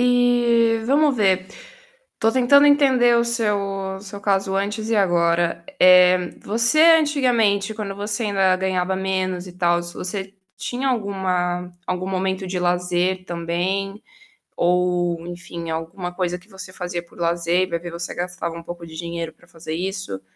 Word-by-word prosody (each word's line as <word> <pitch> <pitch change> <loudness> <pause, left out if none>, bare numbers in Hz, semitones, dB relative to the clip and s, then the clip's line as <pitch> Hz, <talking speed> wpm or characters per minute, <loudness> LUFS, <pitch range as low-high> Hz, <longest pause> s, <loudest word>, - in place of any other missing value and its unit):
E, 240 -2 +3
vamos 285 +1 +3
ver. 190 -3 +2 0.7
Estou 225 - +1
tentando 260 +4 +5
entender 260 -5 +4
o 235 - +3
seu 230 -3 +1 0.4
o - - -10
seu 200 0 -9
caso 195 -1 0
antes 210 +3 -2
e - - +2
agora. 170 -3 +1 0.2
Eh, 180 -1 +6
você, 235 +7 +2 0.2
antigamente, 235 -9 +1
quando 205 -2 -5
você 210 +3 -3
ainda 195 -3 +2
ganhava 185 0 -1
menos 185 -1 -2
e - - -10
tals, 175 -1 0
você 190 +1 -5 0.2
tinha 250 +2 -4
alguma 185 -6 -1
algum 180 0 -3
momento 190 0 -2
de 180 0 -3
lazer 180 +1 0
também, 185 +4 -3 0.6
ou 175 -1 0
enfim 175 -1 -7
alguma 175 +3 -5
coisa 180 -1 -2
que 180 - -20
você 190 -3 -8
fazia 180 -2 -5
por 170 - -21
lazer 170 +1 +1
e - - -2
vai 170 - -1
ver 175 +1 -7
você 170 0 -5
gastava 175 -1 -4
um 170 - -7
pouco 175 0 -8
de 160 -1 -12
dinheiro 170 -1 -5
para - - -24
fazer 160 -1 -8
isso? 190 - -4
185 Hz, 155 wpm, -21 LUFS, 175-210 Hz, 0.7 s, Eh